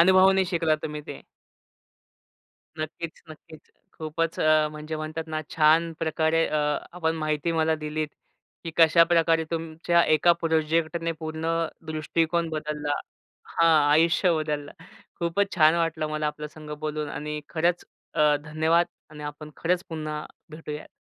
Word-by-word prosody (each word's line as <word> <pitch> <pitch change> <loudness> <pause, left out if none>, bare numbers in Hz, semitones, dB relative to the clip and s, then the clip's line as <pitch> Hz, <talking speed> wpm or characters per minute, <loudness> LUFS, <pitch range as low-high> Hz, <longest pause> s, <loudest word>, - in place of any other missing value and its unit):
अनुभवाने 190 +2 +6
शिकला 165 -2 +2
तुम्ही 150 0 -6
ते. - - -8 1.6
नक्कीच, 155 +1 -6
नक्कीच. 155 0 -14 0.3
खूपच 160 +1 -2
अ, 155 -1 +4
म्हणजे 155 +1 -6
म्हणतात 155 +1 -4
ना 155 0 -2
छान 165 +1 +4
प्रकारे 160 0 +1
अ, 155 - 0 0.3
आपण 165 -2 -1
माहिती 155 +1 -1
मला 160 0 +2
दिलीत 155 0 -3 0.6
की 165 - -4
कशाप्रकारे 165 0 +5
तुमच्या 165 +1 +1
एका 155 +3 +4
प्रोजेक्टने 165 +1 0
पूर्ण 160 0 -4 0.4
दृष्टिकोन 165 +2 0
बदलला 150 -1 -3 0.7
हां, 155 -3 +5
आयुष्य 165 +4 +4
बदललं. 150 -2 -3 0.5
खूपच 195 +4 0
छान 155 0 +6
वाटलं 165 -2 0
मला 155 0 -1
आपल्यासोबत 150 0 -7
बोलून. 150 -1 -3
आणि 150 +1 -4
खरंच 170 +1 0 0.6
धन्यवाद 160 +3 +2 0.2
आणि 150 -1 -10
आपण 150 +1 -7
खरंच 180 +2 0
पुन्हा 155 -2 -4 0.3
भेटूया. 150 -1 -7
160 Hz, 125 wpm, -26 LUFS, 155-165 Hz, 1.6 s, अनुभवाने